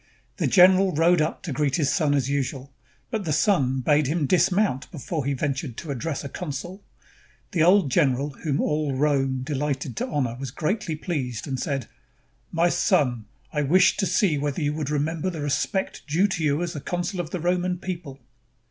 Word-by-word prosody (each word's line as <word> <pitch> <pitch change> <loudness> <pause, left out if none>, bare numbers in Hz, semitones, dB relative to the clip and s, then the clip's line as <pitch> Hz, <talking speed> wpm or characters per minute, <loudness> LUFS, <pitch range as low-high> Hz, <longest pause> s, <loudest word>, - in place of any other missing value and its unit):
The - - +1
general 185 0 +6
rode 165 +2 +4
up 155 - -2
to 170 - -4
greet 140 -1 0
his 145 -4 +1
son 145 -3 +2
as 135 -3 +1
usual, 135 -1 -3 0.4
but 220 -3 -2
the 160 - -2
son 140 -5 +2
bade 150 +2 +3
him 155 +1 0
dis 175 +4 +3
mount 185 -9 0
before 155 -1 -4
he 140 0 0
ventured 135 -2 -3
to 155 - -5
address 140 +3 -3
a - - -4
consul. 175 +6 -6 0.7
The 175 - 0
old 180 -3 +5
general 140 -1 +2
whom 140 0 -2
all 150 -2 0
Rome 135 -2 +1
deHghted 140 -2 -2
to - - -1
honor 130 -6 -1
was 135 -1 -4
greatly 160 - -2
pleased 130 - -3
and 135 -2 -3
said, 140 -5 -2 0.7
"My 170 +1 +3
son, 135 - +1 0.3
I 150 - +1
wished 180 +6 +4
to 195 - +2
see 165 -8 +2
whether 145 +1 -2
you 145 0 0
would 150 -2 -3
remember 155 +4 -1
the 165 -4 -5
respect 145 +6 -1
due 170 +7 +3
you 155 0 0
as 170 - -3
consul 175 +1 -3
of 170 -3 -3
the 180 - -4
Roman 180 +1 0
people." 170 -7 -6
150 Hz, 185 wpm, -25 LUFS, 140-175 Hz, 0.7 s, general